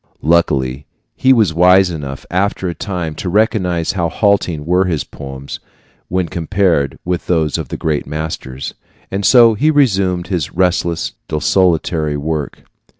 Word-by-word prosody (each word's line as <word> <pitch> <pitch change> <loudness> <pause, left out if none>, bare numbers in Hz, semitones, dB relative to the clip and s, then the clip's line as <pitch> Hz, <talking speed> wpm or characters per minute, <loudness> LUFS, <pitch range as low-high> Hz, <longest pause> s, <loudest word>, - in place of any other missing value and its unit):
Luckily, 70 -4 +1 0.3
he 130 - +3
was 110 -10 +4
wise 90 +2 +5
enough, 70 -4 -6
after 95 +1 0
a 85 - -2
time, 90 -4 -4
to 90 - -5
recognize 95 -5 +1
how 85 -3 -1
halting 95 -8 0
were 90 +3 +2
his 80 -5 -1
poems 70 0 -8 0.5
when 90 0 -1
compared 85 -3 0
with 90 -1 -2
those 80 -4 +1
of - - -5
the - - -5
great 75 -3 -2
masters; 75 -3 -5 0.4
and 100 +1 -2
so 115 +2 +6
he 145 +9 +1
resumed 95 - +2
his 90 -6 -2
restless, 85 -2 0
desultory 80 -2 +1
work. 75 0 -4
85 Hz, 145 wpm, -16 LUFS, 75-95 Hz, 0.5 s, so